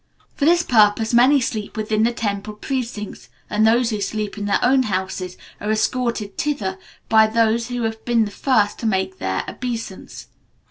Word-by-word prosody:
For 285 - -1
this 345 +2 +4
purpose, 220 -3 +3
many 255 +4 +6
sleep 220 -3 -4
within 215 0 0
the 230 +2 +3
temple 210 -2 -3
precincts, 230 -3 -5 0.2
and 215 +1 +3
those 235 +1 +3
who 210 -1 -2
sleep 210 0 -3
in 205 -1 -4
their 205 - +2
own 260 +2 +4
houses 185 -1 -3 0.2
are 210 - -4
escorted 220 -1 -1
thither 195 -11 -2 0.3
by 220 -1 +5
those 230 +1 +1
who 245 -1 -3
have 220 0 -3
been 235 -2 +2
the 205 - -6
first 215 -4 +1
to 230 - -2
make 190 -2 -1
their 95 0 -1
obeisance. 230 -6 -6
220 Hz, 175 wpm, -21 LUFS, 205-240 Hz, 0.3 s, many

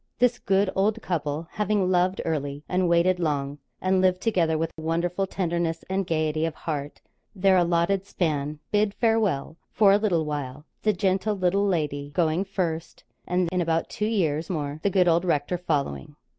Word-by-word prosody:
This 245 0 +2
good 195 -3 +1
old 210 +3 +1
couple, 155 -2 -2
having 205 -3 0
loved 185 +1 +2
early 145 -2 -2
and 180 -1 +1
waited 175 +2 +3
long, 145 -3 -1 0.2
and 185 0 +2
lived 185 -1 +3
together 175 -7 +1
with 165 +1 -2
wonderful 170 +4 -1
tenderness 170 -3 -2
and 190 -1 0
gaiety 155 -1 0
of 165 -1 -1
heart 145 -2 -5 0.3
their 190 0 +4
allotted 175 +2 +2
span, 150 -5 -1
bid 210 -1 +1
farewell 210 - +1
for 205 -3 +5
a 200 - +6
little 175 -7 +1
while 145 -1 -5 0.2
the 215 - +3
gentle 195 +1 0
little 195 +2 +1
lady 150 -6 -1
going 165 +1 +2
first, 175 -4 -3 0.2
and, 180 0 +1
in 180 -1 0
about 165 -1 0
two 210 - -1
years 165 -8 0
more, 150 -4 -3
the 200 - +2
good 185 -2 +3 0.2
rector 170 0 0
following. 145 - -2
175 Hz, 165 wpm, -25 LUFS, 155-195 Hz, 0.3 s, a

